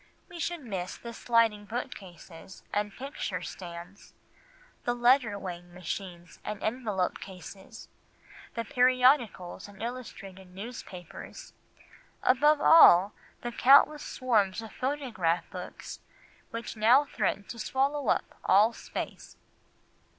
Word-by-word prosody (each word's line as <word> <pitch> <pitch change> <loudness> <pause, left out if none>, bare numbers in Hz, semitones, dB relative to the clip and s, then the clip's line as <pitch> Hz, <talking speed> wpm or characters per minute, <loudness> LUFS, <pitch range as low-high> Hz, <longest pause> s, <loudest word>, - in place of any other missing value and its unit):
We 345 - -9
should 345 0 -3
miss 185 -5 -4
the 235 0 -9
sliding 225 -3 +2
bookcases, 190 - -8
and 205 0 0
picture 205 - -5
stands, 175 +2 -9 0.7
the 240 - 0
letter 240 -3 +3
weighing 175 -2 -8
machines 175 -1 -7
and 210 -1 -5
envelope 215 -6 -1
cases, 190 0 -11 0.7
the 230 0 -3
periodicals 250 -7 +2
and 200 -1 -15
illustrated 195 -6 -8
newspapers—above 250 - -3
all, 205 - +7 0.3
the 240 - -4
countless 285 +4 +6
swarm 215 -7 +1
of 225 -1 -8
photograph 230 - -1
books 180 -2 -8 0.5
which 230 0 -6
now 240 +7 +5
threaten 200 -6 -1
to 235 - -9
swallow 275 +2 0
up - - 0
all 210 +5 +5
space." - - -7
215 Hz, 105 wpm, -29 LUFS, 185-255 Hz, 0.7 s, all